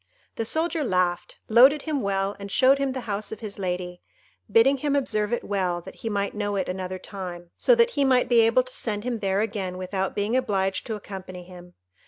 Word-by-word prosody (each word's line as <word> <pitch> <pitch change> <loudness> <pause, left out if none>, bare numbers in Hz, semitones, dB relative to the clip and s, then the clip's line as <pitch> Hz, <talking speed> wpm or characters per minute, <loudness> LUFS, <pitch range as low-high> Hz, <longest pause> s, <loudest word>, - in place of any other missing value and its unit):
The 225 - -2
soldier 320 +4 0
laughed, 180 -5 0
loaded 265 +6 +6
him 300 -4 -1
well, 195 0 -1
and 200 0 -7
showed 265 +4 +4
him 275 -1 0
the 260 - -4
house 210 -2 -4
of 220 - -7
his 205 -2 -6
lady, 180 -1 -3 0.5
bidding 255 +6 +5
him 285 +1 0
observe 215 -6 0
it 240 - -1
well 185 -4 -1
that - - -11
he 225 - -4
might 200 -1 -1
know 205 -1 -2
it 190 -2 -1
another 185 0 -4
time, 180 -3 -8
so - - +4
that 470 0 +4
he 285 - +1
might 255 -2 +3
be 240 -1 +4
able 230 +3 +4
to 255 0 -8
send 210 -3 -2
him 240 -2 -2
there 195 0 0
again 195 -4 -3
without 190 +1 -3
being 205 +4 0
obliged 195 -6 0
to 220 - -2
accompany 185 -3 -8
him. 180 0 -14
205 Hz, 215 wpm, -25 LUFS, 185-250 Hz, 0.5 s, loaded